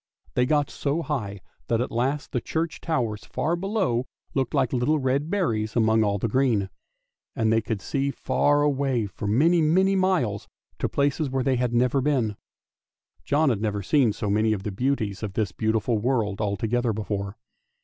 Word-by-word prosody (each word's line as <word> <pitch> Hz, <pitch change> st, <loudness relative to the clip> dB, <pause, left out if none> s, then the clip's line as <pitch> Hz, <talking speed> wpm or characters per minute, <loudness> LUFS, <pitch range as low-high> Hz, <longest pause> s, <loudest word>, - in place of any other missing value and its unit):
They 125 Hz, 0 st, +2 dB
got 145 Hz, -1 st, +1 dB
so 150 Hz, +4 st, -1 dB
high 105 Hz, -11 st, -3 dB, 0.3 s
that 115 Hz, -, +1 dB
at 125 Hz, -, -2 dB
last 135 Hz, +5 st, -1 dB
the 125 Hz, -, -1 dB
church 160 Hz, +4 st, -3 dB
towers 120 Hz, -10 st, -1 dB
far 165 Hz, +3 st, -1 dB
below 175 Hz, -, -1 dB, 0.3 s
looked 135 Hz, 0 st, -1 dB
like 135 Hz, -3 st, +1 dB
little 130 Hz, +5 st, +2 dB
red 140 Hz, +2 st, 0 dB
berries 115 Hz, -, -1 dB
among 110 Hz, -1 st, +3 dB
all 100 Hz, -1 st, +1 dB
the 110 Hz, -, -1 dB
green; 110 Hz, -5 st, +1 dB, 0.6 s
and 110 Hz, -1 st, +2 dB
they 115 Hz, -, +3 dB
could 105 Hz, -3 st, -4 dB
see 140 Hz, 0 st, -1 dB
far 145 Hz, +1 st, +1 dB
away 135 Hz, -5 st, +1 dB
for 100 Hz, +1 st, -6 dB
many, 160 Hz, +11 st, +4 dB
many 190 Hz, +5 st, +3 dB
miles, 180 Hz, -, +1 dB, 0.3 s
to -, -, -1 dB
places 140 Hz, +1 st, 0 dB
where 130 Hz, 0 st, -1 dB
they 130 Hz, -1 st, +1 dB
had 120 Hz, -1 st, 0 dB
never 125 Hz, +3 st, +2 dB
been! 125 Hz, -7 st, +1 dB, 0.9 s
John 150 Hz, +1 st, +3 dB
had 110 Hz, -5 st, 0 dB
never 105 Hz, -2 st, -1 dB
seen 130 Hz, +1 st, +3 dB
so 105 Hz, -, -4 dB
many 110 Hz, +2 st, +2 dB
of 100 Hz, -3 st, -4 dB
the 105 Hz, -, -3 dB
beauties 110 Hz, -2 st, -1 dB
of 105 Hz, -3 st, -4 dB
this 105 Hz, -3 st, -1 dB
beautiful 110 Hz, +2 st, 0 dB
world 110 Hz, -4 st, 0 dB
all 100 Hz, -1 st, -1 dB
together 115 Hz, +2 st, 0 dB
before. 100 Hz, -1 st, -4 dB
125 Hz, 180 wpm, -25 LUFS, 110-145 Hz, 0.9 s, many